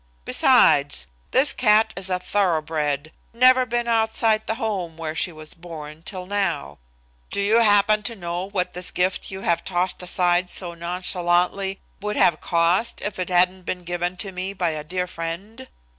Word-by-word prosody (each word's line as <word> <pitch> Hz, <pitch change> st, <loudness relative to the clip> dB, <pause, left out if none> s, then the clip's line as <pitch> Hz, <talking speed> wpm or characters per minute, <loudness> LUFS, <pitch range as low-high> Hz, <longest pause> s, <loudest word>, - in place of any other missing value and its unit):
Besides, 65 Hz, -, +4 dB, 0.2 s
this 275 Hz, +3 st, +4 dB
cat 220 Hz, -1 st, +3 dB
is 190 Hz, +1 st, -2 dB
a 185 Hz, -, +1 dB
thoroughbred, 155 Hz, -6 st, -1 dB, 0.2 s
never 255 Hz, +1 st, +5 dB
been 240 Hz, 0 st, -1 dB
outside 220 Hz, -1 st, +1 dB
the 220 Hz, -, -1 dB
home 190 Hz, -8 st, -3 dB
where 160 Hz, -1 st, -4 dB
she 165 Hz, +3 st, +1 dB
was 155 Hz, -1 st, -7 dB
born 160 Hz, -3 st, -10 dB
till 180 Hz, +1 st, -7 dB
now. 180 Hz, -, -2 dB, 0.5 s
Do -, -, -3 dB
you 210 Hz, +3 st, +3 dB
happen 210 Hz, -1 st, +4 dB
to 230 Hz, -, -8 dB
know 175 Hz, 0 st, -5 dB
what 180 Hz, -3 st, -2 dB
this 180 Hz, +1 st, -1 dB
gift 180 Hz, +1 st, -1 dB
you 190 Hz, 0 st, -7 dB
are 170 Hz, -, +3 dB
tossing 180 Hz, 0 st, -2 dB
aside 180 Hz, 0 st, +1 dB
so 175 Hz, -2 st, -2 dB
nonchalantly 180 Hz, +2 st, 0 dB, 0.2 s
would 210 Hz, +1 st, -3 dB
have 165 Hz, -3 st, +3 dB
cost 175 Hz, +7 st, +1 dB
if 205 Hz, -2 st, -4 dB
it 180 Hz, -, -3 dB
hadn't 185 Hz, +1 st, +3 dB
been 180 Hz, 0 st, -5 dB
given 175 Hz, +1 st, -3 dB, 0.2 s
me 185 Hz, +2 st, -4 dB
by 180 Hz, -4 st, -1 dB
a 155 Hz, -1 st, -5 dB
dear 180 Hz, +3 st, -3 dB
friend? 180 Hz, +9 st, -7 dB
180 Hz, 165 wpm, -23 LUFS, 170-205 Hz, 0.5 s, never